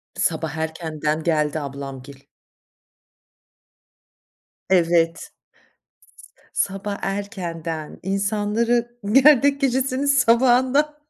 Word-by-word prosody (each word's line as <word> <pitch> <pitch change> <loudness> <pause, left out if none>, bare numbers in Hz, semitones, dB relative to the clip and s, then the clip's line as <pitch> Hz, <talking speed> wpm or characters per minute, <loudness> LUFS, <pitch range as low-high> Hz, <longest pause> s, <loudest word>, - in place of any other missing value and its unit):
Sabah 160 - -2
erkenden 160 -1 -3
geldi 155 -2 0
ablamgil. 140 -1 -8 2.5
Evet, 170 -2 +3
s - - -11 1.4
sabah 200 +1 -5
erkenden, 170 -6 -5
insanları 215 +5 -1
gerdek 280 +2 +5
gecesinin 265 +1 0
sabahından 260 +2 +3
195 Hz, 65 wpm, -22 LUFS, 160-245 Hz, 2.5 s, gerdek